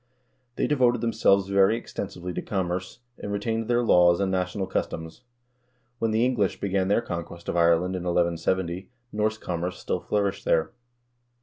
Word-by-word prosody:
They - - 0
devoted 125 -5 +2
themselves 110 -4 +3
very 100 +3 +4
extensively 90 -6 -6
to - - -3
commerce, 95 +3 -3 0.2
and 100 - -5
retained 110 +2 -2
their 120 0 +2
laws 90 -5 +5
and 95 -1 0
national 95 +1 -1
cus 95 - -1
toms. 80 +7 -8 0.8
When 115 - +1
the 110 +2 +2
English 115 -7 0
began 95 -1 0
their 100 +4 +3
conquest 85 0 -6
of - - -2
Ireland 85 +2 +3
in 90 -1 -4
1170, 85 +1 0 0.2
Norse 110 +1 0
commerce 90 -2 -3
still - - -2
flourished 100 -2 -1
there. 80 -1 +1
95 Hz, 160 wpm, -26 LUFS, 90-110 Hz, 0.8 s, laws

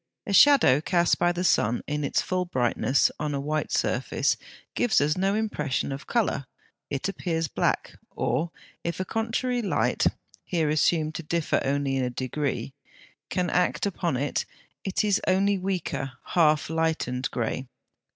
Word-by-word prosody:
A 200 - -2
shadow 235 - +6
cast 175 +1 +2
by 175 - +3
the 175 +1 -2
sun, 120 -9 +2
in 150 0 -2
its 140 - +1
full 185 -1 -1
brightness, 130 -3 +2
on 150 -1 -2
a - - -1
white 155 +2 -2
surface, - - +1 0.4
gives 230 -5 +3
us 150 +2 +2
no 195 +2 +1
impression 150 - -1
of 135 +2 -6
colour; 215 - 0 0.4
it 140 +5 -2
appears 165 -4 -2
black, - - -1
or, 165 +2 -1 0.3
if 170 +1 -3
a 185 - -1
contrary 235 +4 -1
light 205 - +1 0.4
(here 165 -5 0
assumed 155 +1 +2
to 165 - -4
differ 165 0 0
only 140 0 0
in 125 -2 -1
degree) 135 +2 -3 0.6
can 180 -1 -1
act 180 - +1
upon 175 -8 -1
it, 140 +3 -1 0.4
it 195 +2 0
is 205 -2 +2
only 195 +1 +3
weaker, 180 -8 -3 0.2
half 155 -3 +3
lighted, 160 -6 0
grey. 125 +2 -3
160 Hz, 150 wpm, -26 LUFS, 140-185 Hz, 0.6 s, shadow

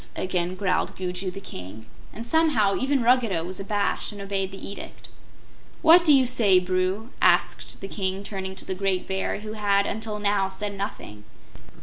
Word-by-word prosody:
again 180 -1 -1
growled 185 -1 0
Gugu 185 0 -3
the 190 +2 -7
King; 105 - -9 0.3
and 230 +2 -8
somehow, 250 -11 +3
even 270 -1 +1
Ruggedo 230 -8 +3
was 185 +2 -5
abashed 200 +2 -1
and 205 - -10
obeyed 195 -1 -2
the 195 - -8
edict. 200 - -9 0.7
"What 335 +2 +8
do 320 - +5
you 270 -2 +6
say, 225 -6 +4
Bru?" 185 +5 -1
asked - - +2
the 195 - -5
King, 195 -1 -2
turning 190 -2 -5
to - - -4
the - - -3
great 190 -1 -1
Bear, 190 +1 -2
who 215 0 -6
had 200 -2 +2
until 220 0 -3
now 200 -2 +1
said 200 +1 -4
nothing. 105 - -6
195 Hz, 170 wpm, -25 LUFS, 185-215 Hz, 0.7 s, What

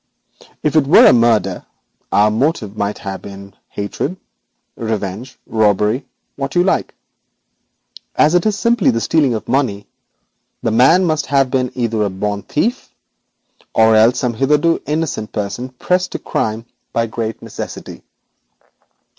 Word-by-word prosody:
If 150 0 0
it 150 -3 +3
were 155 - +7
a - - +8
murder, 110 -6 +2 0.5
our 105 +1 +4
motive 110 -3 -1
might 105 0 -2 0.2
be 100 0 -9 0.2
hatred, 105 - -4 0.6
revenge, 110 +1 -4
robbery 110 +4 +1 0.3
what 140 +2 -4
you 175 - +4
like. 190 - 0 1.2
As 155 +2 +4
it 180 +4 +3
is 210 -1 0
simply 235 -2 +2
the 115 - +1
stealing 140 -1 +2
of 110 - -6
money, 115 -7 0 0.8
the 115 - +1
man 135 +11 +5
must 155 -3 0
have 135 -2 +2
been 125 -2 0
either 115 -3 -1
a 105 - +1
born 100 +2 -3
thief 225 - -2 0.9
or 110 0 +5
else 115 +3 +5
some 125 -1 -1
hitherto 150 +7 +2
innocent 150 -8 -2
person 110 +4 -4
pressed 180 +8 -1
to - - -1
the - - -22
crime 110 +1 -2 0.3
by 115 - +1
great 115 0 -4
necessity. - - -8
120 Hz, 140 wpm, -17 LUFS, 105-150 Hz, 1.2 s, a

